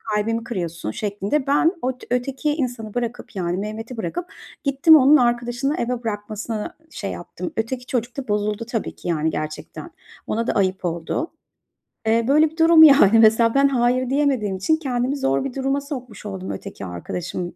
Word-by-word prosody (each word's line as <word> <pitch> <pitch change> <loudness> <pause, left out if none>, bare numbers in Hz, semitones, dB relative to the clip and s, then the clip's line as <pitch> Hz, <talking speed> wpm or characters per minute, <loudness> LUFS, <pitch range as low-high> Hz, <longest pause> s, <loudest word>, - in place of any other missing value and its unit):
kalbimi 225 +2 0
kırıyorsun 170 - -4
şeklinde. 210 - -2
Ben 295 +5 +3
ot 255 0 -3
öteki 265 +4 -1
insanı 245 -7 -4
bırakıp, 240 -1 -4
yani, 175 -1 -1
Mehmet'i 220 +4 -5
bırakıp 220 - -3 0.4
gittim 275 +3 +6
onun 285 +2 +6
arkadaşını 240 +3 0
eve 240 0 -2
bırakmasına 215 +2 -4
şey - - -5
yaptım. 320 - -7
Öteki 245 +3 -2
çocuk 240 -1 -3
da 270 -3 -5
bozuldu 210 +2 -1
tabii 230 -2 -4
ki, - - -9
yani, 160 -2 +1
gerçekten. 155 0 -6 0.4
Ona 230 +1 -1
da - - +2
ayıp 190 -1 0
oldu. 170 - -3 0.8
Eee, 230 +1 +3
böyle 300 +3 +4
bir 320 - -19
durum, 325 -1 +7
yani, 250 -8 +7
mesela. 225 +1 +5
Ben 275 0 +5
"hayır" 255 -1 +1
diyemediğim 265 -9 +1
için 315 +12 +1
kendimi 260 -2 -1
zor 135 - 0
bir 270 - -4
duruma 270 +1 0
sokmuş 255 -8 -8
oldum 190 -2 -5
öteki 195 - -7
arkadaşım 175 - -5
235 Hz, 165 wpm, -22 LUFS, 205-270 Hz, 0.8 s, durum